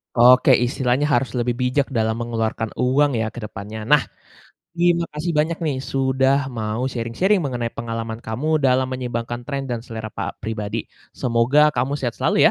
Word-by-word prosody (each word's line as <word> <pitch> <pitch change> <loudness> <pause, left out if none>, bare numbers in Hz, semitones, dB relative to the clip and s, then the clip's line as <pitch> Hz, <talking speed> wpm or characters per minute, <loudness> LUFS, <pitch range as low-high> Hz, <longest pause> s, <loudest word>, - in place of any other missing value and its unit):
Oke, 125 +2 +7
istilahnya 125 +2 +1
harus 130 0 +1
lebih 120 0 0
bijak 125 +2 +1
dalam 110 -2 0
mengeluarkan 115 -1 -2
uang 130 0 +2
ya 110 - 0
ke - - -5
depannya? 105 +1 -7
Nah, 150 - +8 0.8
terima 170 -1 +2
kasih 160 +3 -2
banyak 160 +2 +1
nih 145 -4 0 0.2
sudah 135 +1 +2
mau 110 +1 -2
sharing-sharing 130 - +1
mengenai 125 -6 -3
pengalaman 115 -1 -5
kamu 150 +8 -1
dalam 130 -1 +3
menyeimbangkan 120 -1 -4
tren 140 -1 -2
dan 120 -3 -3
selera 110 -3 -7
pa - - -4
pribadi. 110 0 -4 0.3
Semoga 130 +6 +3
kamu 130 +4 -1
sehat 120 -4 -3
selalu - - +3
125 Hz, 160 wpm, -22 LUFS, 115-140 Hz, 0.8 s, Nah